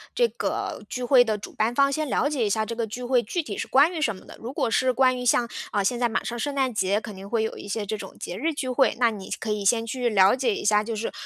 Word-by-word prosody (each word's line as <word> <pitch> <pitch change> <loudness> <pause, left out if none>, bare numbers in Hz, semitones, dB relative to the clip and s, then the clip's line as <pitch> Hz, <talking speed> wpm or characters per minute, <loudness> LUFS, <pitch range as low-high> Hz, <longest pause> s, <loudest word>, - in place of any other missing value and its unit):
这 480 - +4
个 - - -4
聚 250 - -4
会 245 0 +6
的 220 -3 -1
主 205 - -10
办 225 +3 0
方， 275 +1 +4
先 305 +1 -2
了 285 - +1
解 290 -5 -1
一 210 - +1
下 220 +1 0
这 230 - -5
个 230 -1 -2
聚 240 +4 -7
会 245 0 +2
具 325 - -3
体 - - -6
是 - - -3
关 290 +6 +4
于 325 - -3
什 225 -8 +1
么 185 - -15
的， - - -12
如 235 - -5
果 240 - -1
是 255 +3 +3
关 255 0 +3
于 - - -4
像 240 0 +3 0.2
呃， 205 -2 +1
现 240 +5 0
在 240 -1 +2
马 225 - -1
上 240 0 -4
圣 285 +3 -2
诞 265 -3 +1
节， 200 -1 +1
肯 215 -2 -9
定 195 +1 -10
会 225 0 +1
有 220 - -3
一 - - -9
些 205 +1 -3
这 210 - -3
种 195 -3 -9
节 175 - -5
日 315 +7 -1
聚 270 - -3
会， 255 +1 +2
那 235 -2 +4
你 200 -3 -8
可 220 - -3
以 210 -1 -2
先 225 +3 +2
去 245 +1 -1
了 195 0 +5
解 250 -5 0
一 - - -5
下， 210 0 +4
就 225 +1 -4
是 220 +2 -3
235 Hz, 335 characters per minute, -25 LUFS, 215-260 Hz, 0.2 s, 会